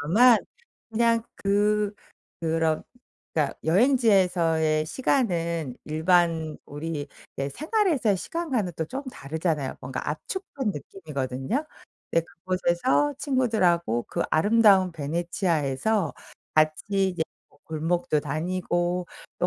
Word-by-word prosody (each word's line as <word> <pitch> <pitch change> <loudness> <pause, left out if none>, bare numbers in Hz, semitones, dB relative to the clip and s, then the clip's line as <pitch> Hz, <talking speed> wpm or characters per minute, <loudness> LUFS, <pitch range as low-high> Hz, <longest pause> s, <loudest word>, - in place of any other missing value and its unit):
다만 220 +11 +6 0.5
그냥 230 0 +2
그 205 +1 +1 0.5
그런 160 -1 +1 0.5
그러니까 150 -3 0
여행지에서의 175 - +3
시간은 170 - 0
일반 160 0 +2
우리 145 0 -5 0.3
네 140 0 -2
생활에서의 310 - +1
시간과는 255 - -2
또 160 - -1
쪼금 265 - -5
다르잖아요. 155 - -2
뭔가 130 +2 -4
압축한 265 - -3
느낌이거든요. 145 - -4 0.5
근데 165 0 +2
그곳에서 185 - 0
친구들하고 185 - +1
그 - - -1
아름다운 200 +1 +5
베네치아에서 165 +2 0 0.4
같이 190 +6 +2
이제 175 -3 -2 0.3
뭐 - - -27
골목도 160 -1 0
다니고 175 +3 -1 0.3
또 - - +2
175 Hz, 270 characters per minute, -26 LUFS, 155-215 Hz, 0.5 s, 다만